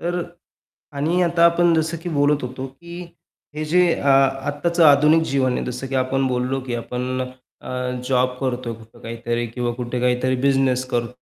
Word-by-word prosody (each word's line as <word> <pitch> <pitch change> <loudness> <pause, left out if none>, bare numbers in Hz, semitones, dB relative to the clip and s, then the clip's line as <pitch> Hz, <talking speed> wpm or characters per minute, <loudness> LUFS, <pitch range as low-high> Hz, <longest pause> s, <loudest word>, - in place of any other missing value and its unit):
तर 175 +1 -2
अ, - - -14 0.7
आणि 160 +6 +1
आता 170 -1 +3
आपण 170 0 +4
जसं 160 +1 0
की 175 - -4
बोलत 145 0 +2
होतो, 130 +1 -5
की 170 +6 -11 0.5
हे 155 +1 -3
जे 180 +4 +3
अ, - - -5
आत्ताचं 145 +5 +2
आधुनिक 150 +2 +6
जीवन 130 -2 +2
आहे, - - -2
जसं 125 +2 -4
की 135 - -5
आपण 135 +1 0
बोललो, 125 +1 -1
की 120 - -3
आपण 125 +2 -3
अ, 130 0 -9 0.4
जॉब 125 -1 +1
करतोय 125 -3 -2
कुठं 110 0 -16
काहीतरी 120 +1 -3
किंवा 120 +1 -3
कुठे 125 0 -3
काहीतरी 125 +1 +1
बिझनेस 135 -2 +2
कर 120 0 -1
135 Hz, 175 wpm, -21 LUFS, 125-150 Hz, 0.7 s, आधुनिक